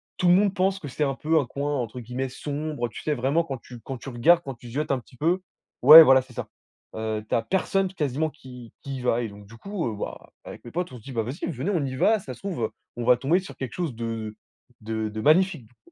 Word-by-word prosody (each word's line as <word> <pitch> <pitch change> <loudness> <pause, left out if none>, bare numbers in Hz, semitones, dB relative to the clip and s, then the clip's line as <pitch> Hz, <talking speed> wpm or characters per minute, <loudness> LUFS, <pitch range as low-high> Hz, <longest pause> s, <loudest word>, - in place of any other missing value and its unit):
tout 180 - +2
le - - +7
monde 195 +1 +3
pense 190 0 +1
que 150 - -7
c'est 145 +3 -2
un 135 -1 +1
peu 160 +4 +1
un 135 - -4
coin, 145 +3 -3
entre 125 -2 -3
guillemets, 125 +3 -4
«sombre», 145 -1 -4
tu - - -9
sais, 150 - 0
vraiment 140 +6 +1
quand 135 -5 -5
tu 120 -2 -12
quand 135 +4 -6
tu 120 - -12
regardes, 135 +8 +4
quand 135 -5 -6
tu 120 0 -12
zieutes 145 +6 -2
un 135 - +1
petit 125 0 -19
peu 170 +6 +1 0.4
ouais, 155 +5 +12
voilà, 130 -2 +6
c'est 130 0 -16
ça. - - -5 0.5
Heu, 110 -1 -2
tu - - 0
as - - +2
personne 190 +6 0
quasiment 150 -2 -1
qui 125 -5 -12
qui 135 -1 -5
y - - -7
va 120 -1 +1
et 115 - -2
donc 100 0 -13
du 115 +3 -14
coup, 195 - -4
heu, 110 - -5
bah, - - -7
avec - - -10
mes 120 - -10
potes, 180 +1 -3
on - - -8
se - - -14
dit: 135 - -9
«Bah, 115 -3 -1
vas-y, 125 +7 -5
venez, 145 +7 -2
on 170 -7 0
y 130 -1 -4
va, 220 +9 +3
ça 135 -9 -8
se 120 - -15
trouve 165 - -3 0.2
on 120 - -4
va 125 0 +6
tomber 160 +7 +2
sur 190 - -10
quelque 130 -2 -5
chose 170 -7 -3
de 115 -2 -4 0.5
de 110 0 -3
de 110 +1 -5
magnifique». 160 - +3
Du 115 - -25
coup, 345 - -27
135 Hz, 275 wpm, -25 LUFS, 120-165 Hz, 0.5 s, ouais